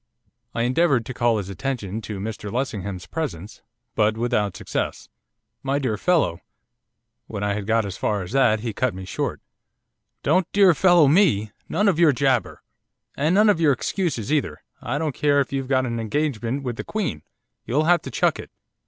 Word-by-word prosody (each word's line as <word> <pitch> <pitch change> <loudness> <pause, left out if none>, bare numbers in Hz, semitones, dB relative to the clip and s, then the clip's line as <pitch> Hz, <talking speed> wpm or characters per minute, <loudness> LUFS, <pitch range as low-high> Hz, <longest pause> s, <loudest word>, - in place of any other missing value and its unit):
I 115 - 0
endeavoured 130 -1 +2
to 125 - -6
call 120 -2 +2
his 100 -3 -4
attention 110 -1 -4
to 105 -2 -6
Mr 105 0 -5
Lessingham's 100 -7 -3
presence, 105 - -5 0.3
but 110 +1 +2
without 105 -5 0
success. - - -4 0.5
'My 135 +1 0
dear 130 -6 -1
fellow 155 - +1 0.4
' - - -55
When 100 - -5
I 105 0 0
had 100 -1 -4
got 115 -1 +2
as 95 -2 -6
far 105 -3 -1
as 90 - -9
that 125 -5 +3
he 115 -2 -3
cut 130 -1 -1
me 95 0 -7
short. - - -3 0.8
'Don't 180 +4 +2
"dear 195 -3 +6
fellow" 175 -3 +5
me! 140 - +3 0.2
None 205 +5 +1
of 180 -5 +2
your 165 -4 +6
jabber! 130 -2 0 0.5
And 155 +6 +1
none 210 +2 +5
of 200 -6 +3
your 150 -3 +5
excuses 150 - -2
either! 110 - -1 0.2
I - - -2
don't 155 -3 -1
care 145 0 +2
if 140 0 -1
you've 135 -1 -2
got 130 -1 +2
an 115 -1 -3
engagement 125 +1 -2
with 120 -3 -4
the - - -4
Queen, 215 -5 -3 0.5
you'll 140 +6 +1
have 170 0 +4
to - - -7
chuck - - +1
it. - - -8
130 Hz, 190 wpm, -23 LUFS, 105-155 Hz, 0.8 s, dear